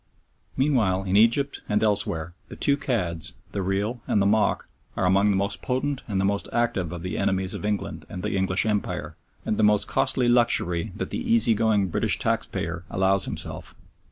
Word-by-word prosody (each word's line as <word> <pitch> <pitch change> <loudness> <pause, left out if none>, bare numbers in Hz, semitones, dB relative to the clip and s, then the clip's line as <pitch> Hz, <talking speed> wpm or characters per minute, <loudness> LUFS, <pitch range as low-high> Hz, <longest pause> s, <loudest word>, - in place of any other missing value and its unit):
Meanwhile, 115 -9 +2
in 95 0 -1
Egypt 115 +6 +3
and 105 +1 +1
elsewhere, 100 -6 0
the - - -9
two 140 - +2
cads, 90 - -2 0.2
the 100 - -2
real 100 +6 -1
and - - +2
the 100 - +2
mock, 105 0 +2 0.3
are - - +1
among 100 +3 +4
the 100 - +2
most 100 +1 -2
potent 135 +2 -1
and 100 -4 -1
the 95 - +1
most 100 0 -1
active 105 -8 0
of 85 -1 -6
the 90 - -3
enemies 95 -1 0
of 105 - -4
England 105 -1 -3
and 90 - -7
the - - -1
English 95 +1 +1
Empire, 105 -2 -2 0.3
and 105 - -1
the - - +2
most 105 -1 +4
costly 130 -2 +1
luxury 115 -8 +2
that - - -5
the - - -2
easy 115 0 +4
going 105 -3 +2
British - - +1
taxpayer 85 +1 -2
allows 95 +1 +2
himself. - - -6
100 Hz, 185 wpm, -25 LUFS, 95-115 Hz, 0.3 s, among